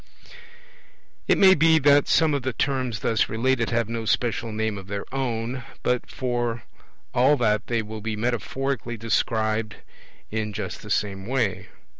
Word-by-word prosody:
It - - +4
may 190 -1 +8
be 160 -1 +5
that 145 -1 +5
some 160 -2 +3
of 140 - 0
the 130 0 -2
terms 130 -5 -1
thus 110 - +1
related 115 +2 +1
have 115 -2 0
no 115 0 -4
special 115 0 0
name 110 -1 -2
of 95 - -12
their 100 0 -4
own, 125 -1 -2 0.2
but 125 0 0
for 120 -3 -2 0.5
all 130 +4 +4
that 105 -4 +1
they 115 -2 0
will 110 0 -7
be 110 +1 -3
metaphorically 120 +2 -2
described 110 -1 0 0.6
in 105 -1 -2
just 105 - -5
the 105 - -10
same 100 -2 -1
way. 120 -7 -1
115 Hz, 155 wpm, -24 LUFS, 110-130 Hz, 0.6 s, may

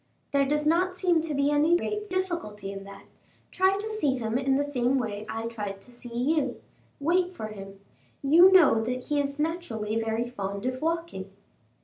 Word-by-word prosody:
"There 280 -1 +2
does 300 +1 0
not 365 +4 +2
seem 350 -4 +2
to 315 -2 -3
be 280 +1 +2
any 300 +4 +4
great 420 +3 -4
difficulty 340 - -3
in 195 0 -8
that; 200 0 -11 0.5
try 375 +1 +3
to 425 +2 -4
see 295 -12 0
him 225 -2 -3
in 270 +1 +2
the 285 - +2
same 270 -2 0
way 215 -4 -3
I 225 0 -4
tried 210 -4 -5
to 250 - -13
see 245 0 -11 0.3
you; 270 -5 -1 0.4
wait 355 +5 +1
for 215 -7 -5
him; 195 -2 -10 0.4
you 335 +7 +7
know 295 -12 +6
that 250 +4 -4
he 295 -1 +2
is 280 0 -2
naturally 295 -10 -2
very 225 +1 -1
fond 200 -3 -5
of 255 0 -2
walking." 330 - -3
275 Hz, 190 wpm, -27 LUFS, 220-335 Hz, 0.5 s, you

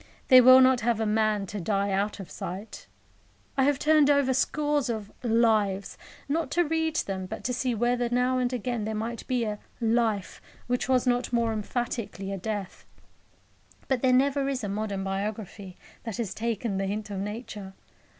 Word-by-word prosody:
They 255 -2 +10
will 255 +1 +9
not 260 -1 +4
have 230 -1 +1
a 220 - 0
man 215 -1 +1
to 205 +1 -6
die 200 +2 0
out 200 +2 -1
of 195 - -9
sight. 190 +5 -7 0.7
I 265 - +3
have 285 -1 +2
turned 300 0 +4
over 280 -2 +3
scores 290 +1 0
of 215 -3 -4
"Lives," 220 -4 +1 0.3
not 310 0 -1
to 350 - +5
read 320 0 -1
them, 190 - -2
but 200 - -7
to 250 - -1
see 245 0 -1
whether 240 +1 +1
now 250 +1 +1
and 250 -1 0
again 240 -2 -2
there 220 0 -3
might 225 +2 -4
be 250 -2 0
a 210 -2 -3 0.2
"Life" 225 -4 0 0.2
which 245 +1 -1
was 255 -1 +3
not 245 -1 +1
more 235 -2 +1
emphatically 215 -3 -3
a - - -3
death. 205 -1 -5 1.0
But 260 -3 0
there 260 - +3
never 275 +2 +2
is 260 -3 -3
a 205 - -2
modern 200 -1 -3
biography 195 -1 -5 0.3
that 225 -4 -5
has 225 -5 -3
taken 225 -2 -2
the 195 - -1
hint 210 +1 -4
of 195 - -3
Nature. 205 -2 -6
230 Hz, 180 wpm, -27 LUFS, 205-255 Hz, 1.0 s, They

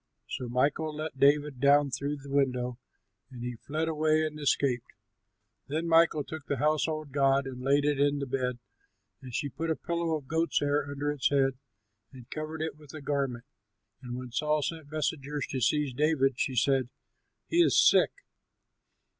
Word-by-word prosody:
So 125 - -5
Michal 145 +5 0
let 155 -3 -5
David 145 -1 +3
down 140 +1 +4
through 140 +3 -2
the 140 0 -11
window; 125 -3 0 0.5
and 125 -3 -9
he 125 -1 -4
fled 155 +3 -1
away 155 0 +2
and 155 -1 -5
escaped. 135 -4 +1 0.8
Then 160 +4 -2
Michal 165 -2 +4
took 155 -1 -8
the 140 - -1
household 155 +1 0
god 135 0 +3
and 130 -1 -7
laid 140 +2 +2
it 145 -1 +1
in 145 0 +3
the 140 - -2
bed, 125 -1 -2 0.6
and 130 -2 -9
she 145 +4 -2
put 165 +5 -4
a 160 - +2
pillow 170 -1 -1
of 145 -4 -6
goat's 165 +2 +1
hair 145 0 0
under 145 +1 -2
its 145 -3 +1
head 135 -2 +1 0.5
and 125 -3 -13
covered 155 +1 -4
it 160 -2 -4
with 150 0 -13
a 155 - -7
garment. 135 -4 -2 0.6
And 125 -1 -6
when 125 -1 -7
Saul 150 +4 +1
sent 160 -2 -5
messengers 150 -2 -2
to 130 - -2
seize 145 +1 +1
David, 135 -2 +2
she 130 - 0
said, 130 0 +2 0.6
"He 335 - -1
is - - +4
sick." - - +6
145 Hz, 175 wpm, -29 LUFS, 135-155 Hz, 0.8 s, sick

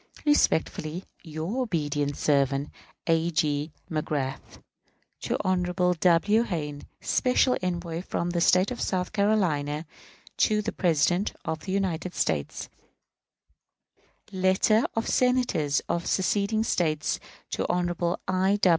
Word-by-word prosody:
Respectfully, 175 - +1 0.2
your 165 +9 -3
obedient 145 - -1
servant, 140 0 +1 0.3
A. 165 0 +2
G. 150 -1 0 0.2
MAGRATH. 150 -4 -3 0.6
To - - -1
Hon. 185 -1 +2 0.4
W. 185 +6 +4
Hayne, 150 -9 -3 0.2
special 250 0 +2
envoy 175 -2 -3
from 175 -1 -2
the 170 -1 0
State 185 +5 +4
of 250 - -5
South 180 0 -1
Carolina 170 -8 +1 0.5
to 210 -1 +2
the 220 - -2
President 175 +3 +1
of 160 - -2
the 185 - -6
United 185 -2 -1
States. 75 -3 -1 1.7
_Letter 190 +4 +3
of 225 - -1
Senators 250 - +2
of 170 0 -2
seceding 205 +3 +1
States 155 -7 0 0.3
to - - -1
Hon. 175 -1 0
I. 190 +2 +2
175 Hz, 110 wpm, -27 LUFS, 155-200 Hz, 1.7 s, W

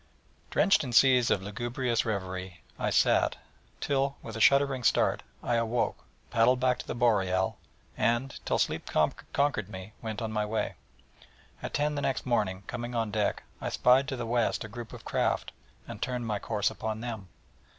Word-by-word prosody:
Drenched 195 - +4
in 125 -3 -5
seas 125 -1 +6
of 95 - +1
lugubrious 120 +3 -1
reverie 95 -4 -4 0.2
I - - 0
sat, - - +3 0.4
till, 140 -1 0
with 110 - -7
a 110 - -3
shuddering 140 -1 +4
start, - - +3 0.2
I 120 - +1
awoke, 115 +1 0 0.3
paddled 120 +2 +4
back 125 -1 +2
to - - -7
the - - -3
Boreal, 95 -6 +2 0.4
and, 120 +3 0
till - - +1
sleep - - -1 0.4
conquered 140 -9 +1
me, 95 +1 -8
went 110 -2 -4
on 115 -1 -3
my 105 -1 0
way. 110 +1 -1 0.9
At - - -4
ten 150 +1 +1
the 145 - -2
next 135 - -1
morning, 100 -6 0
coming 120 0 -5
on 115 -2 0
deck, 105 -1 0 0.2
I - - -2
spied 130 +2 +4
to 135 - -2
the 120 -2 -4
west 120 0 +1
a - - -6
group 115 +1 -8
of - - -11
craft, - - 0 0.4
and - - -8
turned 125 -2 -2
my 105 -2 -1
course 105 -2 0
upon 110 0 -4
them. 110 -5 -5
115 Hz, 175 wpm, -29 LUFS, 105-125 Hz, 0.9 s, seas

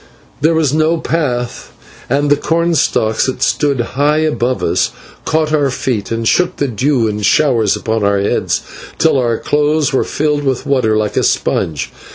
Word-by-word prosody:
There 160 +3 +3
was 155 -4 +1
no 160 +2 +2
path, 130 -8 -3 0.4
and 145 +3 +1
the - - +6
cornstalks, 160 -9 +1
that 130 - -2
stood 145 -4 +1
high 145 +5 0
above 140 -5 0
us, - - +1 0.4
caught 155 -1 0
our 145 -3 +2
feet 125 -4 -2
and 115 0 -1
shook 180 +6 +2
the 140 - -1
dew 125 0 0
in 105 0 -3
showers 115 -3 +2
upon 110 -3 -2
our 100 0 +2
heads, 100 - 0 0.4
till 160 -4 +3
our 120 -2 0
clothes 150 0 0
were 130 - +2
filled 150 -1 -1
with 135 -3 -1
water 120 -6 +1
like 105 -1 -2
a - - +2
sponge. 75 -3 -1
140 Hz, 170 wpm, -15 LUFS, 115-155 Hz, 0.4 s, the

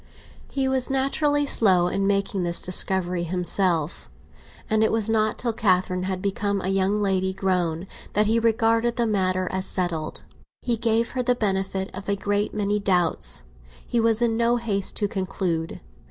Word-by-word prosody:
He 270 -1 -1
was 265 0 +1
naturally 290 +2 +1
slow 190 -10 +3
in 195 +2 -1
making 200 -1 0
this 170 -1 +2
discovery 180 -1 +2
himself, 170 - +1 0.6
and 220 0 +2
it 220 - +2
was 225 -1 +2
not 215 -1 +1
till 235 -2 -1
Catherine 185 -3 +1
had 185 0 -4
become 200 0 -1
a 185 - -3
young 195 +2 +1
lady 190 -1 0
grown 180 -3 -1 0.3
that 210 +1 +3
he 225 +2 +2
regarded 230 +1 +1
the 235 - +1
matter 185 -3 0
as 190 0 -1
settled. 170 -4 -2 0.4
He 240 -2 0
gave 230 0 0
her 255 - -2
the 250 0 +1
benefit 190 -3 -2
of 195 +1 -7
a 200 - +2
great 205 +1 -1
many 210 0 -1
doubts; 180 - 0 0.4
he 240 - -1
was 230 0 +2
in 230 -1 +1
no 235 +1 +2
haste 210 -5 -1
to 205 - 0
conclude. 185 -4 -3
200 Hz, 170 wpm, -24 LUFS, 185-225 Hz, 0.6 s, slow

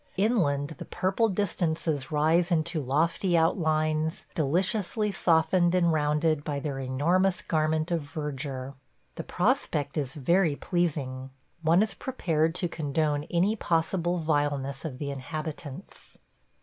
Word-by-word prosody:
Inland 170 - +1
the - - -6
purple 190 +5 0
distances 165 -7 -1
rise 160 +4 +3
into 165 -1 0
lofty 165 +6 +1
outlines 155 -1 +1
deliciously 190 +7 +1
softened 175 0 +3
and 170 -2 +3
rounded 150 0 +1
by 145 -1 -2
their 140 -1 -4
enormous 170 +9 +1
garment 155 0 0
of 170 -2 +1
verdure. 140 -3 -5 0.4
The - - -6
prospect 145 0 0
is 135 -3 -2
very 165 +2 +2
pleasing. 140 -7 -2 0.3
One 165 +5 +4
is 215 -2 -2
prepared 165 -10 -1
to 180 - 0
condone 150 -1 -1
any 185 +5 +1
possible 175 -1 0
vileness 145 -3 -1
of 135 -5 -5
the 140 0 -4
inhabitants. 155 +3 -7
160 Hz, 125 wpm, -27 LUFS, 145-175 Hz, 0.4 s, One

